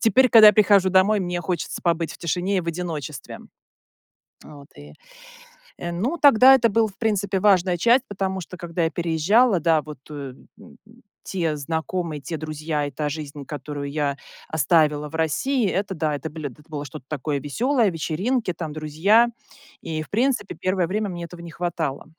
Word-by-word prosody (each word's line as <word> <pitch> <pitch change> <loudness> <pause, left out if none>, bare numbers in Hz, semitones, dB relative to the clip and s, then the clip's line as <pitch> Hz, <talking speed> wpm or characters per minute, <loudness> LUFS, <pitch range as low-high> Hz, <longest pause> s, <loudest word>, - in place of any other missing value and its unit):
теперь, 255 +2 +4
когда 220 -2 +9
я - - +7
прихожу 200 -2 +4
домой, 195 +3 +4
мне 175 -1 -2
хочется 175 -1 -3
побыть 165 -1 0
в - - -13
тишине 180 +4 -1
и - - +1
в 170 - -10
одиночестве. 160 -5 -5 1.1
Вот 140 -2 -13
и, 75 +1 -13 0.9
э, 175 - -5
ну, 235 - -2
тогда 265 -2 +8
это 230 -3 +3
была, 220 +1 +2
в 195 - -14
принципе, 200 -4 0
важная 185 -3 +3
часть, 240 +7 +4
потому 190 -1 -3
что 180 +2 -10
когда 170 0 -3
я - - +1
переезжала, 175 +7 +2
да, 160 -1 +2
вот, 150 -3 -10
э, - - -8
м, 135 -3 -9
м, - - -16 0.5
те 165 -5 -2
знакомые, 160 +1 -3
те 160 +2 -5
друзья 155 -1 -3
и 145 - -5
та 150 +3 -3
жизнь, 145 -1 -7
которую 145 0 -6
я 145 -2 -1 0.3
оставила 150 -1 +2
в 160 - -9
России- 210 - 0
это, 195 +1 -2
да, 155 -3 -1
биле 155 -1 -6
это 150 +4 -17
было 150 -2 -6
что-то 130 -1 -10
такое 145 -1 -2
веселое: 230 - +1
вечеринки, 185 +8 -1
там 160 -3 -6
друзья. 160 +10 +3 0.5
И, 155 -1 -4
в - - -9
принципе, 240 -1 0
первое 185 -2 0
время 210 +2 -2
мне 175 -2 -6
этого 170 0 -11
не 170 -1 -9
хватало. 165 -5 -3
170 Hz, 180 wpm, -23 LUFS, 150-200 Hz, 1.1 s, когда